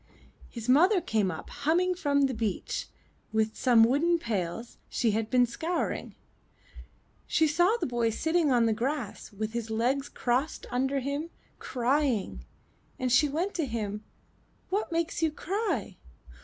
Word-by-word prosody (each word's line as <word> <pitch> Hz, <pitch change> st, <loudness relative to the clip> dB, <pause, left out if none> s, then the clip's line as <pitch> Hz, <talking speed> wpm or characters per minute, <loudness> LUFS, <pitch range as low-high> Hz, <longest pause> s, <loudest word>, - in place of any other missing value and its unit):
His 230 Hz, -1 st, -7 dB
mother 355 Hz, +10 st, +5 dB
came 220 Hz, -, 0 dB
up 160 Hz, -, -7 dB
humming 335 Hz, +6 st, +1 dB
from 285 Hz, -5 st, +1 dB
the 270 Hz, -1 st, +2 dB
beach, 220 Hz, -5 st, -3 dB, 0.4 s
with 220 Hz, 0 st, 0 dB
some 240 Hz, -3 st, +5 dB
wooden 295 Hz, +9 st, +3 dB
pails 220 Hz, -, -4 dB
she 230 Hz, -3 st, +1 dB
had 220 Hz, +1 st, -1 dB
been 250 Hz, -1 st, +4 dB
scouring; 325 Hz, +9 st, -3 dB, 1.1 s
she 320 Hz, -, +3 dB
saw 350 Hz, +8 st, +3 dB
the -, -, -1 dB
boy 240 Hz, -2 st, 0 dB
sitting 320 Hz, +6 st, +1 dB
on 240 Hz, -3 st, +4 dB
the 225 Hz, -, +2 dB
grass, 245 Hz, -1 st, -3 dB
with 215 Hz, +2 st, -4 dB
his 235 Hz, -1 st, -3 dB
legs 250 Hz, +5 st, 0 dB
crossed 255 Hz, +5 st, -1 dB
under 265 Hz, +2 st, 0 dB
him, 285 Hz, +5 st, -3 dB, 0.3 s
crying, 255 Hz, -3 st, 0 dB, 0.5 s
and 255 Hz, -1 st, -1 dB
she 290 Hz, +4 st, +5 dB
went 345 Hz, +8 st, -1 dB
to 330 Hz, -, -1 dB
him. 210 Hz, -3 st, -4 dB, 0.7 s
''What 405 Hz, -1 st, -1 dB
makes 335 Hz, 0 st, -1 dB
you 325 Hz, -, +3 dB
cry?" 400 Hz, +8 st, -3 dB
260 Hz, 145 wpm, -28 LUFS, 225-320 Hz, 1.1 s, mother